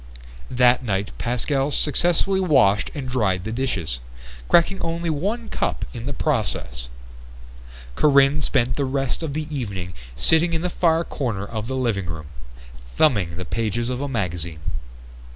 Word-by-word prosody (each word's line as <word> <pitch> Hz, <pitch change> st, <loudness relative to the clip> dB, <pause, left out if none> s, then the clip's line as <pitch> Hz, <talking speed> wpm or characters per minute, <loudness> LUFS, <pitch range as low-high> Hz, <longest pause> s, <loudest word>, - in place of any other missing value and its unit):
That 125 Hz, 0 st, +4 dB
night 100 Hz, -3 st, -1 dB
Pascal 135 Hz, +3 st, 0 dB
successfully 175 Hz, +7 st, +2 dB
washed 135 Hz, -, +4 dB
and 140 Hz, -3 st, -4 dB
dried 100 Hz, -8 st, 0 dB
the 110 Hz, -, -4 dB
dishes, 115 Hz, -, -2 dB, 0.5 s
cracking 190 Hz, +3 st, +4 dB
only 165 Hz, 0 st, -1 dB
one 205 Hz, +10 st, -2 dB
cup -, -, -2 dB
in 120 Hz, 0 st, -6 dB
the -, -, -1 dB
process. 100 Hz, -, 0 dB, 1.0 s
Corinne 140 Hz, -, +4 dB
spent 125 Hz, -3 st, +1 dB
the 140 Hz, -, +1 dB
rest 135 Hz, +1 st, -1 dB
of 160 Hz, -4 st, -3 dB
the 155 Hz, +1 st, -2 dB
evening 100 Hz, -8 st, -4 dB, 0.2 s
sitting 160 Hz, -, +3 dB
in 165 Hz, -, 0 dB
the 180 Hz, -, -1 dB
far 165 Hz, -1 st, +2 dB
corner 115 Hz, -11 st, -3 dB
of 110 Hz, +1 st, -5 dB
the 130 Hz, -, -2 dB
living 115 Hz, -8 st, 0 dB
room, 80 Hz, -2 st, -5 dB, 0.7 s
thumbing 100 Hz, -, +3 dB
the 90 Hz, -, -5 dB
pages 115 Hz, +4 st, -1 dB
of 125 Hz, +1 st, -3 dB
a 145 Hz, -, -1 dB
magazine. 85 Hz, -, -3 dB
125 Hz, 150 wpm, -23 LUFS, 100-150 Hz, 1.0 s, That